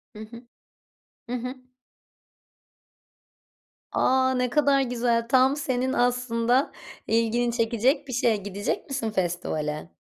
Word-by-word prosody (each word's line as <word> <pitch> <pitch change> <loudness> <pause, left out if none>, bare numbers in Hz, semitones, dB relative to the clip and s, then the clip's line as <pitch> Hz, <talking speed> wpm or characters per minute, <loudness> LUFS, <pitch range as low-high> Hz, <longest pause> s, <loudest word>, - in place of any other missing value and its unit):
Hı - - -9
hı, 235 +2 -12 0.9
hı 250 - -2
hı. 250 +2 -4 2.4
A! 260 0 +2
Ne 250 -1 0
kadar 280 0 +3
güzel. 240 -2 0
Tam 260 +2 +4
senin 260 -2 -1
aslında 245 +1 +1 0.4
ilgini 230 +1 +1
çekecek 240 +5 +1
bir 260 - -5
şey. 230 -2 +2
Gidecek 205 +1 -3
misin 245 -5 -2
festivale? 170 -5 -2
245 Hz, 110 wpm, -25 LUFS, 230-260 Hz, 2.4 s, Tam